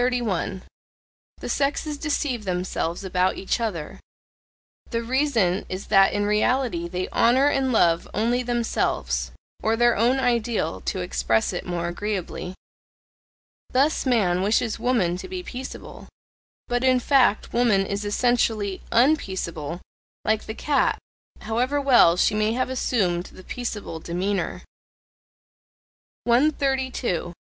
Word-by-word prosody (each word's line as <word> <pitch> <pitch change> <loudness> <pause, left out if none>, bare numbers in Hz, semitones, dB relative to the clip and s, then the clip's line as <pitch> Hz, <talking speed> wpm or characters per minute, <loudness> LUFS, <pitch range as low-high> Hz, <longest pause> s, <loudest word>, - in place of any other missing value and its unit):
The 230 -7 -1 0.9
sexes 290 +2 -1
deceive 285 -6 -1
themselves 180 -2 -2
about 185 0 0
each 195 - -1
other: 190 -10 -4 0.9
the 230 -1 -2
reason 230 -7 +1
is 185 +2 -5
that 195 -1 +6
in 205 0 0
reality 210 -3 +1
they 180 +1 -3
honour 260 +5 +4
and 270 -2 +1
love 170 -7 +3
only 235 +4 +1
themselves 220 - -1 0.3
(or 220 +1 +1
their 240 +1 +3
own 245 +5 +2
ideal, 235 - 0
to - - -2
express 65 - 0
it - - -5
more 170 -1 -2
agreeably). 185 0 -4 1.2
Thus 275 +2 +2
man 190 -8 +2
wishes 215 +3 +1
woman 195 -9 +1
to - - -7
be 370 -1 -5
peaceable: 260 -5 -8 0.6
but 245 +1 -1
in 255 -1 +4
fact 250 -4 +2
woman 225 -5 +3
is 200 +1 -3
ESSENTIALLY 215 -2 0
unpeaceable, 190 - 0 0.4
like 220 0 0
the 220 - -5
cat, 290 +3 +1 0.4
however 245 +6 0
well 245 -11 +5
she 205 - +3
may 215 +1 +1
have 255 +1 -1
assumed 190 -9 0
the 185 - -13
peaceable 210 -9 -5
demeanour. 180 +4 -2 1.6
132. 260 - +1
220 Hz, 120 wpm, -24 LUFS, 185-250 Hz, 1.6 s, that